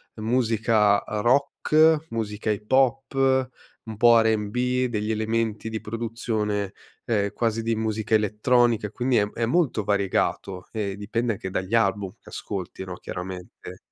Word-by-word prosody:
musica 110 -2 +2 0.2
rock, 155 +5 +3
musica 110 -1 -3
hip 105 +2 -3
hop, 135 0 +2 0.7
un 110 -2 -7
po' 120 0 +6
R&B, 120 +4 0
degli 110 -2 -2
elementi 110 0 -1
di 110 -1 -4
produzione, 110 -3 -3 0.3
ehm 100 -3 0
quasi 115 -1 0
di 115 0 0
musica 110 0 -2
elettronica, 110 +1 +2
quindi 125 +2 +1
è 105 - +3
m 105 - -11
è 115 - -1
molto 130 -4 +1
variegato 100 -2 -1
e 100 -3 -3
dipende 115 +3 -1
anche 95 -2 -6
dagli 95 +3 -4
album 100 -3 +1
che - - -15
ascolti, 95 -1 -6
no, 90 - -6
chiaramente. 90 0 -8
110 Hz, 140 wpm, -25 LUFS, 105-120 Hz, 0.7 s, po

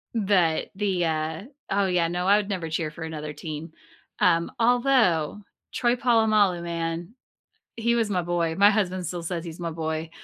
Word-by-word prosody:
But 190 -7 +2
the, 190 -4 0
uh, 160 +2 -2 0.3
oh 200 0 +2
yeah, 175 -2 +2
no, 180 +1 -2
I 205 +1 +6
would 205 -1 -2
never 175 -5 -3
cheer 160 -1 -2
for 160 +2 -9
another 155 -2 -5
team, 155 +1 -7 0.5
um, 170 -2 +3
although 230 - +2 0.3
Troy 240 0 +2
Polamalu, 215 -7 +3
man, 170 +4 -4 0.6
eh, - - -6
he 235 +1 +2
was 225 -3 +1
my 180 -3 0
boy, 170 -1 -1
my 200 +2 +6
husband 185 -4 0
still 170 +1 -4
says 170 0 -4
"He's 165 +1 -8
my 170 -1 -3
boy," 160 0 -3
175 Hz, 175 wpm, -25 LUFS, 165-205 Hz, 0.6 s, I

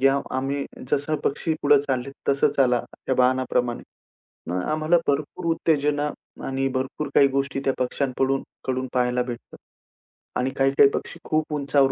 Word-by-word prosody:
घ्या 135 +1 +4 0.2
आम्ही 140 +1 -1 0.3
जसं 145 +2 +1
पक्षी 160 +3 0
पुढे 145 0 +6
चाललेत 135 -1 -2 0.2
तसं 140 0 +4
चाला 125 -3 +4 0.3
त्या 130 - +2
बाणाप्रमाणे. 125 -1 +1 0.7
मग 90 +1 -1
आम्हाला 155 +3 +3
भरपूर 150 +5 -1
उत्तेजना 150 -2 +1 0.4
आणि 135 0 0
भरपूर 130 +3 -2
काही 140 - +7
गोष्टी 135 0 -1
त्या 135 - +3
पक्ष्यांकडून 135 +1 0
पडून - - -13 0.2
कडून 130 0 -1
पाहायला 125 0 +2
भेटतात 120 -1 -8 0.8
आणि 130 +1 +1
काही-काही 135 +1 +5
पक्षी 165 - -5
खूप 155 0 0
उंचावर 140 -1 +3
135 Hz, 145 wpm, -24 LUFS, 130-145 Hz, 0.8 s, काही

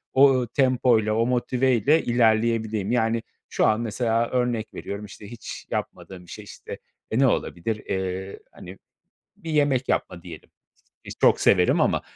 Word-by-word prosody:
o, 135 0 +6
ııı, 125 -2 0
tempoyla, 125 -4 +2
o 115 +1 +1
motiveyle 125 +3 +2
ilerleyebileyim. 110 -3 +1
Yani, 115 -1 0 0.3
şu - - +1
an 110 +1 +2
mesela 115 0 -1
örnek 120 -3 -2
veriyorum, 100 +1 -6
işte, 100 0 -12
hiç 120 - -9
yapmadığım 90 -2 -6
bir - - -14
şey, - - -9
işte, - - -10 0.3
e, 110 - 0
ne 135 - +5
olabilir? 110 -2 -1
Eee, 95 0 -4
hani, 90 +2 -12 0.6
bir 170 -5 -8
yemek 145 -4 +1
yapma 90 -2 -2
diyelim. 85 -3 -11 0.5
Ki - - -9
çok - - +4
severim 90 -2 +3
ama - - +1
115 Hz, 155 wpm, -24 LUFS, 105-125 Hz, 0.6 s, o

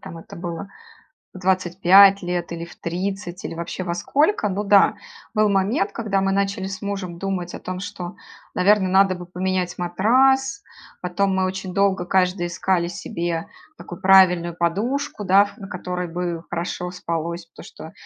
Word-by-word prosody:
там 180 -3 -9
это - - -12
было 170 +2 -6 0.7
в 185 - -9
25 190 +2 +5
лет, 175 -1 -3
или 170 0 -5
в 170 - -14
30, 180 +1 -4
или - - -5
вообще 170 +2 -5
во 170 -1 -2
сколько. 290 - +1
Ну 195 +2 -2
да, 200 -1 +5 0.4
был 215 -1 +3
момент, 195 +1 +1
когда 205 -4 -1
мы 195 0 +1
начали 195 -1 -1
с 195 +1 -6
мужем 195 -4 -4
думать 185 -2 -3
о - - -6
том, 185 0 -5
что, 180 -2 -6 0.4
наверно, 195 0 +3
надо 190 0 +4
бы 175 - -8
поменять 180 0 -2
матрас. 260 - +2 0.4
Потом 190 +2 0
мы 190 0 +1
очень 185 0 -4
долго 195 -2 +1
каждый 180 -1 +1
искали 175 0 0
себе 170 -1 -4 0.3
такую 175 +1 -10
правильную 180 -3 +5
подушку, 210 +8 -1
да, 200 +2 +5
на 195 - -9
которой 180 -1 -4
бы 170 0 -3
хорошо 180 +1 -3
спалось, 170 -1 -4
потому 165 - -14
что 160 - -11
185 Hz, 165 wpm, -22 LUFS, 175-195 Hz, 0.7 s, 25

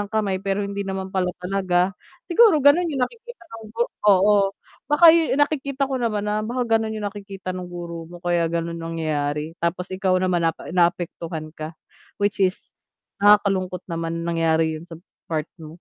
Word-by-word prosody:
ng 205 - -4
kamay 205 -4 -1
pero 195 +1 -1
hindi 200 0 -4
naman 190 0 -4
pala 185 -1 0 0.2
talaga. 185 -1 +1 0.3
Siguro 425 0 +5
gano'n 335 +5 +5
yung 270 -5 +1
nakikita 480 - -12
nung 225 -1 -9
gu 230 +2 -1 0.3
oo, 200 0 +4 0.3
baka 320 +3 +8
yu 330 -5 +2
nakikita 280 -2 0
ko 265 -1 -3
naman 215 -3 -1
na, 210 0 0
baka 240 +3 -2 0.2
gano'n 220 0 -3
yung 210 - -5
nakikita 195 -2 -6
nung 180 -1 -6
guro 170 -2 -7
mo 175 - -10
kaya 175 -1 +1
gano'n 170 0 -3
nangyayari, 155 -2 -2
tapos 180 +2 -2
ikaw 185 -1 +1
naman 185 -1 +1
naap 165 - -3 0.2
naapektuhan 170 -3 -1
ka, 155 0 -8 0.4
which 205 -1 -1
is 185 0 +3 0.6
nakakalungkot 195 -3 +3
naman 165 0 -3
na 170 - -1
nangyari 160 -1 +2
'yun 165 - -12
sa 165 - -9 0.3
part 155 -2 -1 0.2
mo. 160 - -9
190 Hz, 175 wpm, -23 LUFS, 170-215 Hz, 0.6 s, baka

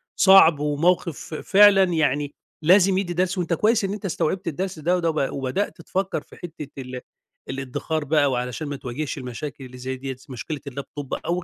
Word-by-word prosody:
صعب 190 -6 +7
وموقف 155 +2 +1
ف - - -10
فعلًا 200 +1 +6
يعني 145 -2 0 0.3
لازم 185 +3 +5
يدّي 180 -3 -1
درس، 180 +1 0
وأنت 175 -1 -1
كويس 215 +4 +2
إن 195 +1 -1
أنت 205 -1 -7
استوعبت 185 +1 -1
الدرس 180 +2 -3
ده 175 +4 +1
وده 170 -2 0
ب 145 -3 -1
وبدأت 140 +7 -2
تفكّر 190 +3 -2
في - - -17
حتة 160 -4 -8
ال 125 0 -7 0.5
الادّخار 135 +4 -3
بقى 145 -2 +3
وعلشان 125 +4 -3
ما 145 - -4
تواجهش 135 +4 -5
المشاكل 135 +2 -6
اللي 125 0 -11
زي 130 +1 -4
دِيّة، 135 0 -5
مشكلة 140 +4 -5
الLaptop 140 +1 -7 0.2
أو 175 +1 -1
155 Hz, 180 wpm, -23 LUFS, 135-185 Hz, 0.5 s, صعب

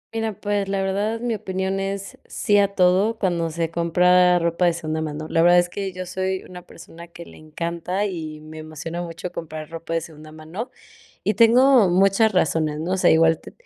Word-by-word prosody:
Mira, 225 -1 -1
pues, 205 -1 -1
la 195 0 -1
verdad, 205 +4 -1
mi 240 -1 -1
opinión 190 -2 -3
es, 195 0 -5
sí 205 -1 +1
a 200 - +4
todo, 190 +5 +3
cuando 175 -5 -1
se 165 0 -3
compra 180 +2 +4
ropa 170 +1 0
de 175 - +3
segunda 160 -1 -3
mano, 155 0 -5
la 165 - +1
verdad 175 +1 +6
es 175 0 +3
que 195 +1 -4
yo 185 0 -6
soy 190 +1 -3
una 180 0 -10
persona 170 +1 -13
que 170 0 -12
le - - -15
encanta 170 +5 -3
y 160 -6 -5
me 155 +1 -11
emociona 155 +2 -6
mucho 170 +1 -6
comprar 155 -1 -7
ropa 165 0 -6
de 165 - 0
segunda 155 -1 -12
mano, 160 +10 -7 0.6
y 210 - +1
tengo 235 0 +5
muchas 195 +4 +3
razones, 155 -4 0
¿no? 170 +3 -3
O - - +1
sea, 185 - +3
igual 160 0 +4
te - - -13
180 Hz, 200 wpm, -22 LUFS, 165-195 Hz, 0.6 s, verdad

